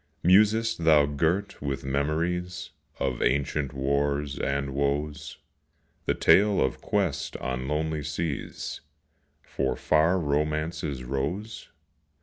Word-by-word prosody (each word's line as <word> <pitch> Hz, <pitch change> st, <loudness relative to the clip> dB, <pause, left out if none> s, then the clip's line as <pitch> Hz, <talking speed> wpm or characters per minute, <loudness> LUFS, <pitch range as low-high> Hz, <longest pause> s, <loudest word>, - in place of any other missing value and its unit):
Musest 110 Hz, +4 st, +4 dB
thou 75 Hz, -3 st, +6 dB
girt 80 Hz, +8 st, -1 dB
with 70 Hz, -1 st, -3 dB
memories 85 Hz, +6 st, -1 dB, 0.3 s
Of 60 Hz, -2 st, -1 dB
ancient 70 Hz, +1 st, 0 dB
wars 70 Hz, +1 st, -1 dB
and 70 Hz, 0 st, -1 dB
woes 75 Hz, +1 st, -2 dB, 0.7 s
The -, -, +2 dB
tale 105 Hz, +1 st, +4 dB
of 65 Hz, -, 0 dB
quest 90 Hz, -9 st, -1 dB
on 65 Hz, 0 st, -3 dB
lonely 75 Hz, +1 st, -1 dB
seas 75 Hz, 0 st, -4 dB, 0.6 s
For 65 Hz, -1 st, -2 dB
far 80 Hz, +4 st, +3 dB
Romance's 75 Hz, -1 st, -1 dB
rose? 80 Hz, -, -4 dB
75 Hz, 105 wpm, -27 LUFS, 70-85 Hz, 0.7 s, thou